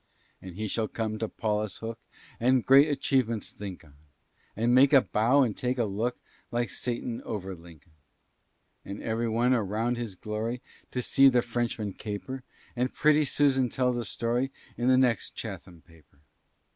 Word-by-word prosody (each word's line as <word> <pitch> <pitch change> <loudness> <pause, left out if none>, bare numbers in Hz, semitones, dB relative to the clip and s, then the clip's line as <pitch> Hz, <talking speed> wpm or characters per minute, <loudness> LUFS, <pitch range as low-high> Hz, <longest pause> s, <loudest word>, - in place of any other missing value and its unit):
"And 90 -2 -9
he 110 +2 -3
shall 110 +2 -1
come 110 -1 -3
to 110 - -2
Paulus 105 -2 -2
Hook, 115 0 -6 0.4
And 125 +1 +3
great 140 +3 +7
achievements 130 -6 0
think 100 -4 -8
on; 75 - -19 0.6
And 115 +3 +2
make 135 +3 +6
a 135 - +8
bow 125 +7 +3
and 115 -5 -1
take 125 +1 -1
a 120 - +2
look, 110 +5 -2 0.3
Like 120 0 -1
Satan 120 -1 -3
over 95 -3 -5
Lincoln. 85 -2 -15 0.9
"And 100 +1 -7
every 115 +1 -1
one 120 +3 +2
around 115 +2 0
shall 120 -1 -3
glory 110 +3 -3 0.3
To 125 - -3
see 135 +2 +6
the 125 -2 +2
Frenchman 115 -4 -2
caper; 110 +7 -6 0.3
And 125 +1 0
pretty 155 0 +3
Susan 135 -2 +2
tell 125 0 +1
the 120 -1 -2
story 120 +3 -1 0.3
In 120 - -1
the 130 0 +5
next 125 -6 +1
Chatham 85 -2 -7
paper." 80 -5 -22
115 Hz, 165 wpm, -28 LUFS, 105-125 Hz, 0.9 s, a